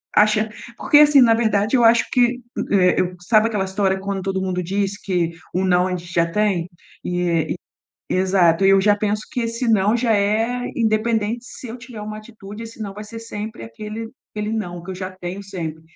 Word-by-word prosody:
acha 215 +1 +4 0.3
porque, 295 - +5
assim, 295 -2 +7
na 230 -2 +6
verdade, 220 0 +1
eu 240 - +4
acho 230 0 +5
que 245 0 +2 0.3
eh, 185 -2 +4 0.2
sabe 215 +3 +3
aquela 210 -4 -1
história 190 0 0
quando 195 0 -3
todo 190 0 -2
mundo 185 -1 -2
diz 200 +2 -1
que 175 -3 -1 0.2
um 190 +1 0
não 180 0 +3
a - - -3
gente 175 0 -8
já 170 -1 +3
tem? 180 -1 0 0.4
E 175 -2 0 0.6
e, - - 0
exato. 185 -1 +3
Eu 195 0 +6
já 205 +1 +4
penso 210 0 -1
que 250 - -1
esse 230 +2 -2
não 210 +1 +3
já 235 -2 +2
é, 220 +5 +1 0.2
independente 225 0 0
se 250 - -9
eu 230 - -6
tiver 235 -2 -10
uma 215 0 -6
atitude, 215 -1 -10
esse 225 0 -10
não 200 -2 -5
vai 210 +1 -8
ser 225 +2 -9
sempre 215 - -7
aquele 215 - -7 0.2
aquele 210 +1 -4
não 175 -6 -4
que 190 - -8
eu - - -4
já 185 0 -5
tenho 185 +1 -7
sempre. 165 -5 -6
205 Hz, 200 wpm, -21 LUFS, 185-225 Hz, 0.6 s, assim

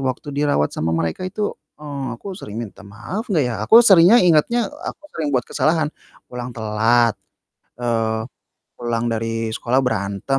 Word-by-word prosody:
waktu 130 +2 -3
dirawat 145 - +1
sama 80 +1 -1
mereka 80 - -2
itu, 205 +2 -3 0.2
eee, 140 -5 -5
"Aku 195 -2 -7
sering 105 - -8
minta 105 - -10
maaf 150 - -6
enggak 160 -8 +2
ya?" 120 - -2
Aku 225 - +8
seringnya 195 +3 +7
ingatnya, 180 +8 +3 0.2
aku - - -18
sering 155 -3 -2
buat 125 - +1
kesalahan. 160 -1 +1 0.4
Pulang 125 0 -6
telat, 115 +1 +2 0.7
eee 115 -2 0 0.6
pulang 120 -1 -2
dari 115 0 -2
sekolah 120 +4 0
berantem. 105 +2 -1
120 Hz, 150 wpm, -20 LUFS, 110-155 Hz, 0.7 s, Aku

